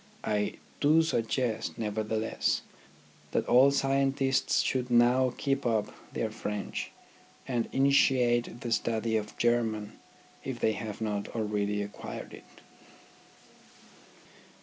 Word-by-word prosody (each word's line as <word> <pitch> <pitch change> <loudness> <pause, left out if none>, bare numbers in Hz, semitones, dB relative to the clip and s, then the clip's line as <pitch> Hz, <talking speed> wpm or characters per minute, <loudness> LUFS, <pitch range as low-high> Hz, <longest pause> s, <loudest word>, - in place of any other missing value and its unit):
I 105 -1 0 0.3
do 155 +3 +5
suggest, 115 -5 -1
nevertheless, 110 0 -1 0.7
that - - +1
all 130 +3 +7
scientists 135 -1 +2
should 125 -1 -1
now 125 +2 +4
keep 135 0 0
up 110 -3 0 0.2
their - - -2
French, 105 -1 -4 0.6
and 120 -3 -1
initiate 125 -3 +3
the 120 - -4
study 115 0 0
of 105 -1 -3
German 115 -3 0 0.4
if - - -5
they 110 - +2
have 110 -1 -6
not 105 -2 -2
already 105 -2 -1
acquired 105 - -8
it. - - -15
115 Hz, 105 wpm, -29 LUFS, 110-130 Hz, 0.7 s, all